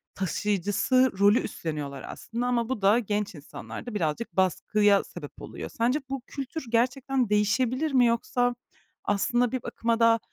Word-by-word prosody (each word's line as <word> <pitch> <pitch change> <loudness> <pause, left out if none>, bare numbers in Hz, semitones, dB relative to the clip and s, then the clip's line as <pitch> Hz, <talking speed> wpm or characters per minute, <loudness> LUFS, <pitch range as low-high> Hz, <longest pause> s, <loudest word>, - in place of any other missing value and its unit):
taşıyıcısı 205 +7 +1
rolü 205 +4 +6
üstleniyorlar 145 -4 -5
aslında 240 +2 -4
ama 235 -1 0
bu 260 -5 -2
da 205 +5 +5
genç 205 -4 -2
insanlarda 155 +10 -8
birazcık 170 +2 -2
baskıya 200 +2 +3
sebep 150 -5 -10
oluyor. - - -7
Sence 245 +6 +1
bu 270 -1 -3
kültür 275 +2 -5
gerçekten 255 +1 +1
değişebilir 250 +8 +1
mi? 255 -2 +5
Yoksa 245 +1 +1 0.5
aslında 240 +4 +1
bir 255 -2 -3
bakıma 230 0 -1
da 230 0 +5
230 Hz, 140 wpm, -27 LUFS, 200-250 Hz, 0.5 s, rolü